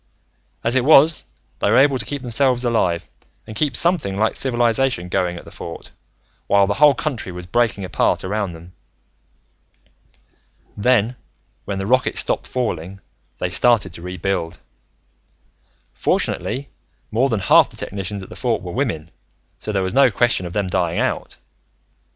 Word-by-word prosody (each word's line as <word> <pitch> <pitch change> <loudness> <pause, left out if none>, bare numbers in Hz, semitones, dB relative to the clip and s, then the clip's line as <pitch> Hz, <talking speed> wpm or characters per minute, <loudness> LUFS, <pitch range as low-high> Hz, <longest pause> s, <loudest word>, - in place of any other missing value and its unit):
"As 115 +2 0
it 130 - +3
was, 155 +2 +5 0.3
they - - +1
were 115 - +4
able 135 -1 +4
to - - -1
keep 145 -2 -4
themselves 125 +1 +1
alive, 95 -8 0 0.4
and 110 - -9
keep 140 +1 0
something 160 - +2
like 110 +2 +1
civilization 120 -6 +1
going 90 -2 -1
at - - -11
the - - -12
Fort, 85 - -9 0.6
while 100 0 +4
the 100 - 0
whole 145 +2 +5
country 125 -6 -3
was 90 0 -8
breaking 110 -1 0
apart - - 0
around 100 -1 -2
them. 85 +2 -13 2.0
"Then, 120 +1 +2 0.5
when 100 - -3
the 95 - -3
rockets 130 +4 +1
stopped - - -1
falling, 100 -7 -3 0.4
they 90 - -3
started 115 +6 +3
to - - -7
rebuild. 90 -1 -3 1.4
Fortunately, 140 +2 -1 0.4
more 125 +5 +2
than 110 -5 -1
half - - +5
the - - -16
technicians 100 0 -5
at - - -12
the - - -10
Fort - - -1
were - - -6
women, 80 +1 -3 0.5
so 110 - -4
there 100 -2 0
was 95 0 -3
no 135 -1 +6
question 115 -4 +1
of 85 - -9
them 105 -2 0
dying 90 -2 -1
out. - - -2
105 Hz, 155 wpm, -20 LUFS, 95-125 Hz, 2.0 s, no